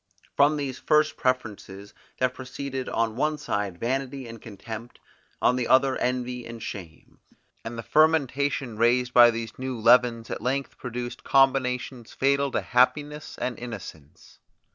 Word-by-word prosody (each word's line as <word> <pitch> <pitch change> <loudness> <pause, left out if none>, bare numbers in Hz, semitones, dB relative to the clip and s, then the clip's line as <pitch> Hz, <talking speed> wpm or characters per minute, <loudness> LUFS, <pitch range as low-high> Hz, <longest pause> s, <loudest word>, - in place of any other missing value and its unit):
From 145 +2 +4
these 135 -3 -4
first 150 0 +2
preferences 105 -5 -3 0.2
there 130 - +3
proceeded 130 +1 -6
on 115 -1 0
one 150 +4 0
side 100 -9 -3
vanity 130 +3 -3
and 115 -1 -10
contempt, 110 +2 -9 0.4
on 125 - +3
the 125 - -1
other 130 0 +4
envy 125 0 -2
and 115 0 -9
shame; 85 -8 -9 0.4
and 115 +1 -6
the 115 - -5
fermentation 145 -5 +2
raised 125 +2 +2
by 120 -1 +8
these 115 0 -5
new 130 -2 -4
leavens 115 0 +4
at - - -4
length 135 +3 -2
produced 120 0 -6
combinations 130 -2 +1
fatal 140 +1 +2
to - - -1
happiness 145 +4 0
and 125 - -3
innocence. 95 - -10
125 Hz, 140 wpm, -26 LUFS, 115-135 Hz, 0.4 s, by